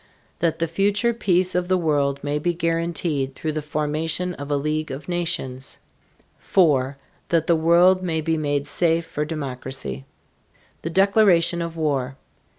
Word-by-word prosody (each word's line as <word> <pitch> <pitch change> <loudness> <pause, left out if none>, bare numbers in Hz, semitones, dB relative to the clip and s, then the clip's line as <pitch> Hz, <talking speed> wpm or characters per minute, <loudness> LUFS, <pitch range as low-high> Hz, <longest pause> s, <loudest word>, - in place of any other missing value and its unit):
That 165 -1 +1
the 165 - 0
future 200 +7 +1
peace 185 -5 +2
of 180 0 0
the 185 0 +2
world 145 -4 0
may 145 +1 -1
be 175 +3 -1
guaranteed 165 -5 -1
through 155 - -3
the 155 0 -3
formation 155 +4 -2
of 145 -3 -8
a 145 - +1
league 155 +2 -2
of 135 +2 -7
nations. 150 -7 -2 0.6
4. 140 -7 +2 0.3
That 165 -2 +2
the 170 - +3
world 170 +3 +4
may 165 -3 -1
be 160 +1 0
made 145 -2 -1
safe 165 0 +1
for 150 -1 -3
democracy. 130 - -5 0.8
THE 165 - -4
DECLARATION 185 -2 +4
OF 165 0 -5
WAR. 140 -4 -1
160 Hz, 155 wpm, -23 LUFS, 145-175 Hz, 0.8 s, world